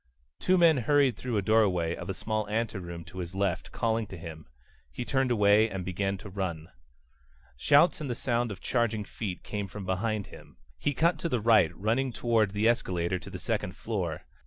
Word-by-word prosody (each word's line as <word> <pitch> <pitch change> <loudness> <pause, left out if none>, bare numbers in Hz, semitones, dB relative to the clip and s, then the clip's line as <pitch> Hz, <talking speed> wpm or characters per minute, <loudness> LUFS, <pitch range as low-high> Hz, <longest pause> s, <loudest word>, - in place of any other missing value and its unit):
Two 185 0 +3
men 165 -4 +6
hurried 135 0 +3
through 120 0 -3
a 100 - 0
doorway 95 -6 +2
of - - -8
a 95 - -2
small 110 -1 -2
anteroom 95 -6 -3
to 95 +2 -10
his 90 +1 -6
left, 95 -4 -1
calling 115 -1 0
to 95 - -9
him. 80 -2 -9 0.4
He 120 - -5
turned 135 -1 +1
away 105 -1 +4
and 95 -3 -5
began 95 +2 -1
to 105 - -10
run. 90 -4 -4 0.9
Shouts 145 - +4
and 145 - -4
the 120 - -1
sound 120 -1 -1
of 95 - -7
charging 115 -3 0
feet 100 -3 -6
came 105 -1 -4
from 95 +1 -8
behind 100 +2 -1
him. - - -14 0.2
He 145 - -1
cut 165 +1 +2
to 170 - -2
the 125 - +1
right, 110 -7 +5
running 120 +6 0
toward 115 -3 +1
the 105 +2 +2
escalator 90 -6 0
to - - -10
the - - -6
second 90 - -2
floor. 90 -8 -3
105 Hz, 195 wpm, -29 LUFS, 95-120 Hz, 0.9 s, men